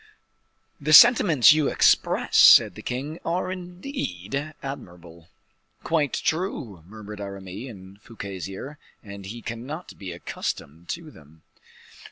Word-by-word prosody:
"The 155 Hz, +2 st, 0 dB
sentiments 165 Hz, -, +8 dB
you 155 Hz, -2 st, +1 dB
express," -, -, +2 dB
said -, -, +8 dB
the -, -, -10 dB
king, 140 Hz, +6 st, -5 dB
"are 180 Hz, +2 st, -2 dB
indeed 165 Hz, -, -6 dB
admirable." 85 Hz, -, -10 dB, 0.6 s
"Quite 150 Hz, -5 st, 0 dB
true," 140 Hz, -, -3 dB
murmured 105 Hz, 0 st, -10 dB
Aramis 100 Hz, +4 st, -8 dB
in 95 Hz, -3 st, -13 dB
Fouquet's 100 Hz, -4 st, -8 dB
ear, 135 Hz, +10 st, -9 dB, 0.2 s
"and 100 Hz, -2 st, -10 dB
he 115 Hz, +3 st, -8 dB
cannot 130 Hz, +9 st, -7 dB
be 95 Hz, -3 st, -7 dB
accustomed 85 Hz, -1 st, -6 dB
to 165 Hz, -2 st, -6 dB
them." 80 Hz, -, -19 dB
115 Hz, 120 wpm, -24 LUFS, 95-155 Hz, 0.6 s, sentiments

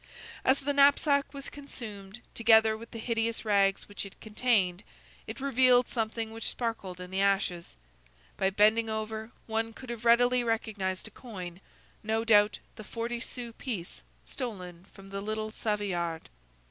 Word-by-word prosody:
As 265 Hz, +2 st, +3 dB
the 285 Hz, +1 st, 0 dB
knapsack 280 Hz, 0 st, +4 dB
was 275 Hz, -1 st, -7 dB
consumed, 225 Hz, -7 st, -8 dB
together 220 Hz, -1 st, +5 dB
with 230 Hz, +1 st, -10 dB
the 230 Hz, -, -8 dB
hideous 225 Hz, 0 st, -1 dB
rags 200 Hz, -2 st, +3 dB
which 205 Hz, -, -5 dB
it 200 Hz, -, -11 dB
contained, 210 Hz, -5 st, +1 dB, 0.5 s
it -, -, -6 dB
revealed 255 Hz, -2 st, +4 dB
something 225 Hz, -1 st, -2 dB
which 225 Hz, 0 st, -3 dB
sparkled 215 Hz, -6 st, -4 dB
in 180 Hz, 0 st, -8 dB
the 190 Hz, +1 st, 0 dB
ashes. 195 Hz, -3 st, 0 dB, 0.6 s
By 190 Hz, -, +2 dB
bending 215 Hz, +3 st, +4 dB
over, 220 Hz, 0 st, -3 dB, 0.2 s
one 225 Hz, 0 st, -1 dB
could 255 Hz, +1 st, -8 dB
have 235 Hz, -1 st, -6 dB
readily 245 Hz, +1 st, +5 dB
recognized 215 Hz, -4 st, -2 dB
a -, -, -13 dB
coin,—no 210 Hz, +1 st, -6 dB
doubt 210 Hz, -2 st, +5 dB, 0.2 s
the 215 Hz, -, -8 dB
forty 235 Hz, +2 st, -4 dB
sou 240 Hz, -1 st, -6 dB
piece 215 Hz, -9 st, -5 dB, 0.2 s
stolen 185 Hz, -8 st, -6 dB
from 195 Hz, -1 st, -14 dB
the 195 Hz, 0 st, -3 dB
little 215 Hz, +1 st, -3 dB
Savoyard. 185 Hz, -7 st, -2 dB
220 Hz, 145 wpm, -30 LUFS, 200-235 Hz, 0.6 s, together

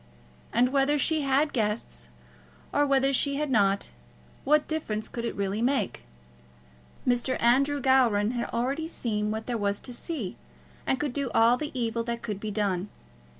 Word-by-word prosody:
And 245 Hz, +2 st, +3 dB
whether 275 Hz, +2 st, +2 dB
she 310 Hz, +2 st, +2 dB
had 280 Hz, +2 st, +2 dB
guests, 210 Hz, -, -2 dB, 0.6 s
or 290 Hz, -, +3 dB
whether 275 Hz, 0 st, +3 dB
she 280 Hz, +1 st, +2 dB
had 295 Hz, -1 st, -1 dB
not, 200 Hz, -4 st, +2 dB, 0.5 s
what 300 Hz, +2 st, +3 dB
difference 220 Hz, -9 st, -2 dB
could 235 Hz, -1 st, -5 dB
it -, -, -3 dB
really 200 Hz, +2 st, -1 dB
make? 240 Hz, -, 0 dB, 1.0 s
Mr. 245 Hz, +1 st, +1 dB
Andrew 275 Hz, +5 st, +3 dB
Gowran 240 Hz, -6 st, +3 dB
had 240 Hz, -1 st, -3 dB
already 270 Hz, +7 st, -1 dB
seen 210 Hz, -9 st, -2 dB
what 220 Hz, +1 st, -3 dB
there 240 Hz, -2 st, -2 dB
was 200 Hz, 0 st, 0 dB
to 250 Hz, -, -6 dB
see, 245 Hz, -, -5 dB, 0.5 s
and 265 Hz, -, +1 dB
could 290 Hz, -3 st, -2 dB
do 280 Hz, -2 st, -1 dB
all 230 Hz, +2 st, +6 dB
the 300 Hz, +3 st, -4 dB
evil 230 Hz, -1 st, -1 dB
that 235 Hz, 0 st, -4 dB
could 210 Hz, -4 st, -4 dB
be 215 Hz, -, -4 dB
done. 200 Hz, -2 st, -1 dB
240 Hz, 165 wpm, -27 LUFS, 215-275 Hz, 1.0 s, all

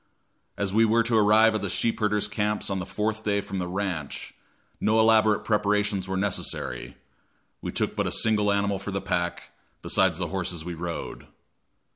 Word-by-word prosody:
As 100 Hz, -1 st, -1 dB
we 110 Hz, +2 st, +5 dB
were 115 Hz, +1 st, +3 dB
to 115 Hz, 0 st, 0 dB
arrive 110 Hz, +1 st, +5 dB
at 110 Hz, -, -1 dB
the 100 Hz, -, -2 dB
sheep 115 Hz, +5 st, -1 dB
herders' 105 Hz, -1 st, +1 dB
camps 105 Hz, -1 st, -2 dB
on 95 Hz, -, -1 dB
the 90 Hz, -, -5 dB
fourth 110 Hz, +1 st, -2 dB
day 100 Hz, -1 st, +1 dB
from 100 Hz, -1 st, -5 dB
the 90 Hz, -, -2 dB
ranch, 90 Hz, -6 st, -4 dB, 0.5 s
no 110 Hz, +1 st, +2 dB
elaborate 110 Hz, -1 st, +4 dB
preparations 105 Hz, -2 st, +1 dB
were 95 Hz, 0 st, -2 dB
necessary; 100 Hz, 0 st, -3 dB, 0.6 s
we -, -, -4 dB
took -, -, -1 dB
but -, -, 0 dB
a -, -, -2 dB
single 105 Hz, -2 st, +2 dB
animal 100 Hz, -1 st, 0 dB
for 100 Hz, -, -6 dB
the 95 Hz, 0 st, -2 dB
pack, 85 Hz, -2 st, -2 dB, 0.3 s
besides -, -, +2 dB
the -, -, -2 dB
horses 85 Hz, -4 st, -3 dB
we 90 Hz, -, -4 dB
rode. 85 Hz, 0 st, -6 dB
105 Hz, 180 wpm, -26 LUFS, 95-110 Hz, 0.6 s, we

